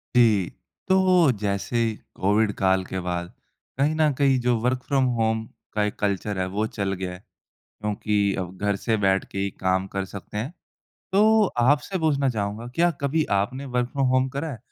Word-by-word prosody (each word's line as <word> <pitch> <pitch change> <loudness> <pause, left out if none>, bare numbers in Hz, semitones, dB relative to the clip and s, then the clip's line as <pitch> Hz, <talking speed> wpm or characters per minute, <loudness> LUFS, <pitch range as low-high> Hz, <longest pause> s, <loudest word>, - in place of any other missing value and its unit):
जी। 110 -7 +4 0.4
तो 185 -5 +5
जैसे 100 +4 -1 0.4
कोविड 105 +2 +2
काल 95 -1 +2
के 95 - -4
बाद 85 0 -3 0.5
कहीं 145 +3 +2
न 155 -1 +4
कहीं 135 -2 +3
जो 125 0 +2
वर्क़ 125 +2 +1
फ्रॉम 135 -2 +2 0.2
होम 110 0 +1 0.3
का 105 - +1
एक 105 - -2
कल्चर 100 0 -1
है 95 - +1
वो 100 +3 -1
चल 100 -3 -2
गया 95 -1 -4
है। 90 - -10 0.4
क्योंकि 105 -1 -1
अब 90 0 -5
घर 100 -1 +1
से 110 +3 0
बैठके 95 0 +1
ही 100 0 0
काम 95 0 +1
कर 95 0 -1
सकते 100 +2 -9
हैं। 125 +9 -3 0.6
तो 215 +2 +5 0.2
आपसे 145 +9 +2
पूछना 145 -4 +2
चाहूँगा 105 -1 -3
क्या 175 +1 +3
कभी 145 +3 +1 0.2
आपने 130 +7 -3
वर्क़ 125 -2 -1
फ्रॉम 135 -1 +1
होम 130 +1 +2
करा 140 +4 -4
है? 120 - -8
110 Hz, 180 wpm, -24 LUFS, 100-140 Hz, 0.6 s, तो